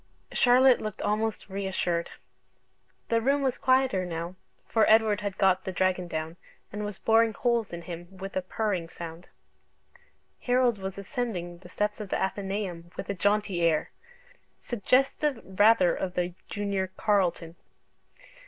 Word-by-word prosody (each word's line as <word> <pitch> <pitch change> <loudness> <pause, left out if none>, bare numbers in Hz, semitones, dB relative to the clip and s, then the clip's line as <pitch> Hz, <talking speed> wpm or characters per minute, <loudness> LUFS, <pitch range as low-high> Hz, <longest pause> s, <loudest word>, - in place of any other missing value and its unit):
Charlotte 255 +1 +5
looked 215 -2 -5
almost 215 +1 -1
reassured. 190 -3 -2 1.0
The 230 0 +2
room 275 +4 +2
was 260 -2 0
quieter 260 -7 +3
now, 170 0 -4 0.3
for 220 -1 +2
Edward 215 -1 +4
had 200 -2 -4
got 190 -1 +3
the 190 - -4
dragon 185 -1 0
down 160 0 -4 0.4
and 210 +1 -4
was 205 -3 -5
boring 225 +2 +3
holes 235 -3 0
in 170 0 -6
him 175 -1 -7
with 195 +1 -7
a 185 - +1
purring 185 -3 -2
sound 170 +1 -9 1.1
Harold 245 -3 +2
was 190 0 -5
ascending 185 -4 -4
the - - -14
steps 210 +1 -2
of 210 -2 -6
the - - 0
Athenaeum 190 -3 -3
with - - -4
a - - -1
jaunty 200 -1 +1
air 165 -2 +2 0.7
suggestive 265 +4 +1 0.2
rather 205 -4 +6
of 180 -1 -4
the 180 0 -1 0.2
Junior 200 -2 -1
Carlton. 175 -5 +1
200 Hz, 145 wpm, -28 LUFS, 180-225 Hz, 1.1 s, rather